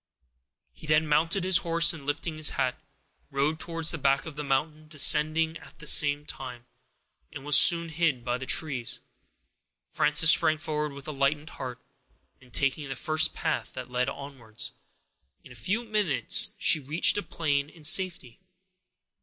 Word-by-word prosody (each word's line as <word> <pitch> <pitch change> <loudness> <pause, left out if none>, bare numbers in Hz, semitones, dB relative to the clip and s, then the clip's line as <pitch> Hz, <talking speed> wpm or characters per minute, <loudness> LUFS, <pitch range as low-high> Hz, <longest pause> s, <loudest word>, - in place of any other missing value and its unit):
He 155 - -14
then 155 +1 +2
mounted 165 +5 +1
his 185 -1 +4
horse, 170 0 +4
and 145 -4 -11
lifting 155 +2 -4
his 155 -1 +3
hat, 130 -2 -2 0.5
rode 145 +3 -1
towards 165 -1 0
the 165 - -6
back 135 0 +1
of 160 -3 -9
the 150 - -6
mountain, 150 +3 -2
descending 155 +2 +2
at - - -17
the - - -12
same 145 -1 +3
time, 125 -4 -9 0.7
and 135 - -10
was 150 -1 +3
soon 170 -1 +6
hid 155 -7 -1
by 120 0 -2
the 130 - -8
trees. 135 -7 -1 0.9
Frances 150 +3 +4
sprang 155 0 +2
forward 150 -1 -4
with 140 +1 -11
a - - -4
lightened 145 +2 -2
heart, 125 -1 -8 0.6
and 125 -1 -20
taking 140 +2 -2
the 135 - -5
first 155 +4 0
path - - -3
that - - -9
led 125 0 0
downwards, 125 -4 -8 0.7
in - - -16
a - - -11
few 190 - -3
minutes 200 - +2
she 160 - +3
reached 150 +4 +2
the 205 - -2
plain 145 -6 -2
in 160 -1 -19
safety. 160 -6 +2
150 Hz, 165 wpm, -26 LUFS, 135-160 Hz, 0.9 s, soon